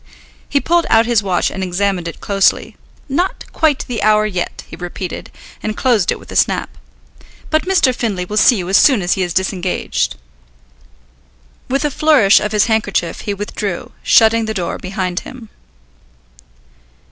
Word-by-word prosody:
He 280 - +2
pulled 340 +3 +1
out 225 0 +4
his 235 -2 +2
watch 185 -3 0
and 190 - -5
examined 185 -1 -1
it 170 - -8
closely. 195 -1 +1 0.3
"Not 345 +7 -2
quite 310 -4 +1
the 240 -4 -3
hour 215 0 +3
yet," 185 -4 -4
he - - -11
repeated, 175 +1 -6 0.3
and 215 0 -4
closed 235 -8 +2
it - - -2
with - - -14
a - - -7
snap. - - 0 0.8
"But 310 +3 +1
Mr. 345 -9 +3
Findlay 205 -7 -2
will 210 - -6
see 240 - +6
you 180 -4 -4
as 195 +2 +4
soon 255 -9 +4
as 175 - +1
he 190 - -2
is 180 -1 -1
disengaged." 185 0 -1 1.5
With 275 +3 0
a 295 - 0
flourish 275 -10 +4
of 210 - -3
his 210 -1 +3
handkerchief 215 -6 -1
he 205 - -3
withdrew, 200 -2 -5
shutting 225 0 +4
the 220 0 -4
door 180 -3 -3
behind 185 -2 -3
him. 240 -4 -11
210 Hz, 165 wpm, -17 LUFS, 185-245 Hz, 1.5 s, see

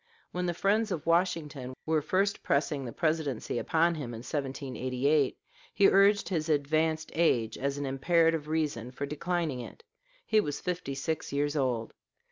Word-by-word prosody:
When 180 0 -2
the 175 - -1
friends 210 +5 +2
of 160 -4 -3
Washington 160 -6 0
were 160 -1 +2
first 190 +6 0
pressing 140 0 0
the 120 - -5
Presidency 155 -6 -1
upon 165 +1 +2
him 130 -7 -5
in 115 - -7
1788, 135 0 -1 0.4
he 200 -1 +6
urged 200 +1 +4
his 165 -4 -1
"advanced 155 +2 +1
age" 120 -9 +2
as 140 +1 -2
an 145 - -3
imperative 160 +3 +2
reason 150 -7 -1
for 135 +2 -4
declining 155 -1 -2
it: 460 - -9 0.4
he 220 - +3
was 145 -6 -3
fifty 180 -6 -3
six 155 +3 -3
years 145 +1 0
old. 125 -5 -1
155 Hz, 155 wpm, -30 LUFS, 135-170 Hz, 0.4 s, he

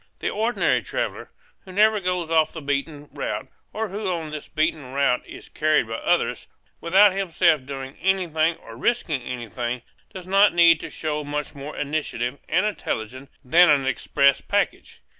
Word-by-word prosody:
The - - -2
ordinary 225 +3 +1
traveller, - - -4 0.3
who 190 - -12
never 215 +2 +4
goes 180 -3 -2
off 160 -1 +3
the 160 - -6
beaten 145 +1 -3
route - - -4 0.2
and 220 -3 -3
who 205 0 -3
on 165 -4 -3
this 150 -1 -7
beaten 155 -4 -2
route 140 -3 +2
is - - -11
carried 155 -6 +1
by 115 0 -4
others, - - 0 0.3
without 190 +4 +5
himself 170 -7 +1
doing 135 -1 -6
anything 170 -4 +1
or 115 - -13
risking 155 - 0
anything, 120 0 -5 0.3
does 185 -2 -9
not 195 +1 +4
need 170 -2 +6
to - - -7
show 150 -1 -3
much 145 +1 -4
more 145 +1 -8
initiative 140 -4 -3
and 180 +5 +2
intelligence 130 - -4 0.2
than 170 +6 +6
an 140 -2 +3
express 140 +1 +2
package. - - -2
155 Hz, 160 wpm, -23 LUFS, 140-180 Hz, 0.3 s, need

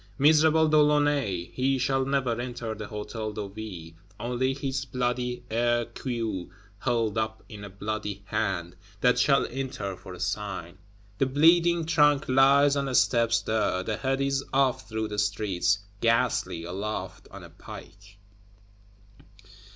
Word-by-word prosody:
Miserable 155 +2 +5
De 155 0 +3
Launay! 145 -12 +1
He 135 +8 +1
shall 135 +1 +1
never 130 -4 0
enter 120 -2 -4
the 110 -1 -7
Hôtel 105 0 -5
de 105 -2 -4
Ville; 95 -6 -8 0.3
only 125 +2 -1
his 135 -1 -3
"bloody 125 0 -2
hair 120 +1 +1
queue, 115 -6 -4 0.3
held 115 -3 0
up 110 0 -3
in 105 -2 -10
a 100 - -7
bloody 100 0 -5
hand"; 85 -4 -2 0.3
that 125 0 +4
shall 135 +2 +4
enter, 130 -7 -4
for 90 0 -10
a - - -12
sign. 95 -2 -4 0.4
The 135 - +3
bleeding 165 +4 +4
trunk 150 -3 +3
lies 140 +2 +5
on 140 -1 0
the 130 -2 -2
steps 115 -2 +3
there; 105 -4 0
the 110 +1 -2
head 135 0 -1
is 135 0 0
off 130 -4 +1
through 110 -1 -2
the 105 0 -3
streets, 100 -3 +1 0.2
ghastly, 115 -7 +1
aloft 95 +1 -5
on - - -11
a - - -12
pike. 100 +3 -12
115 Hz, 145 wpm, -27 LUFS, 100-135 Hz, 0.4 s, Miserable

